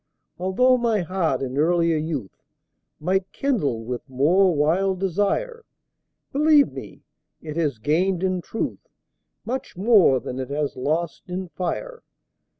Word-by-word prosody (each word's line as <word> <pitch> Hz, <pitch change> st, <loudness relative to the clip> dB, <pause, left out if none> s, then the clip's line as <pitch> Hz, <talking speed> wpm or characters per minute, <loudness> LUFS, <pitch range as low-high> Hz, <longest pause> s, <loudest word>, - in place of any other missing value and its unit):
Altho' 250 Hz, +8 st, +3 dB
my 230 Hz, -4 st, +1 dB
heart 170 Hz, -7 st, -1 dB
in 130 Hz, +1 st, -3 dB
earlier 170 Hz, +1 st, +3 dB
youth 150 Hz, -, -3 dB, 0.6 s
Might 185 Hz, +4 st, -1 dB
kindle 160 Hz, -, -1 dB
with 125 Hz, +3 st, -6 dB
more 170 Hz, +9 st, +3 dB
wild 180 Hz, +6 st, +1 dB
desire, 205 Hz, -, -1 dB, 0.7 s
Believe 295 Hz, 0 st, +4 dB
me, -, -, -10 dB, 0.4 s
it 155 Hz, -1 st, -7 dB
has 150 Hz, -7 st, 0 dB
gained 170 Hz, -, 0 dB
in 185 Hz, -1 st, 0 dB
truth 220 Hz, -, -5 dB, 0.6 s
Much 255 Hz, -5 st, -5 dB
more 195 Hz, -, +5 dB
than 125 Hz, +1 st, -6 dB
it 130 Hz, -, -4 dB
has 145 Hz, 0 st, -2 dB
lost 155 Hz, +7 st, -2 dB
in 180 Hz, 0 st, -4 dB
fire. 470 Hz, -, -4 dB
180 Hz, 130 wpm, -23 LUFS, 150-195 Hz, 0.7 s, more